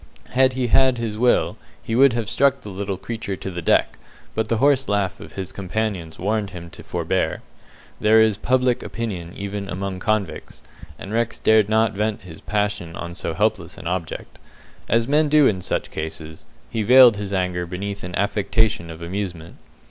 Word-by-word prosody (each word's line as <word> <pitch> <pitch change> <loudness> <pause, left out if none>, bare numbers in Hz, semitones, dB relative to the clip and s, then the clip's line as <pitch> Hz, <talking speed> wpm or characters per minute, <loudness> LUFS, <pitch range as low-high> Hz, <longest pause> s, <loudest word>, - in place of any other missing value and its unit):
Had 130 0 +3
he 130 -1 -1
had 130 +1 +4
his 115 -2 -3
will, 120 +3 +2 0.3
he 115 - -4
would 135 0 +6
have 115 -2 -2
struck 135 +4 +2
the 105 - -8
little 95 0 -3
creature 110 -1 -5
to 95 - -6
the 90 -1 -5
deck, - - +2 0.3
but 110 -1 -1
the 115 - 0
hoarse 135 +1 +3
laugh 100 -2 0
of - - -11
his 95 -2 -5
companions 95 -4 -3
warned 105 +1 -1
him 85 -2 -9
to - - -12
forbear. - - -2 0.6
There 110 +1 +5
is 110 -2 +4
"public 125 +3 +1
opinion" 95 -7 -5
even 100 0 -5
among 95 0 -4
convicts, 105 -3 -2 0.3
and 100 - -8
Rex 115 0 0
dared 110 -2 +4
not 110 +1 +3
vent 105 0 -2
his 85 -3 -11
passion 105 -5 -2
on 85 0 -6
so 85 -2 -4
helpless 90 -3 0
an - - -10
object. 85 -1 -4 0.5
As 115 0 +2
men 150 +1 +3
do 150 -1 +6
in 95 -7 +2
such - - -2
cases, 80 0 -6 0.2
he 115 - -1
veiled 125 0 +7
his 100 -1 -5
anger 90 -2 -1
beneath 100 +3 -5
an 90 0 -5
affectation 100 -1 +1
of 80 +1 -8
amusement. 85 -2 -5
105 Hz, 180 wpm, -22 LUFS, 90-115 Hz, 0.6 s, veiled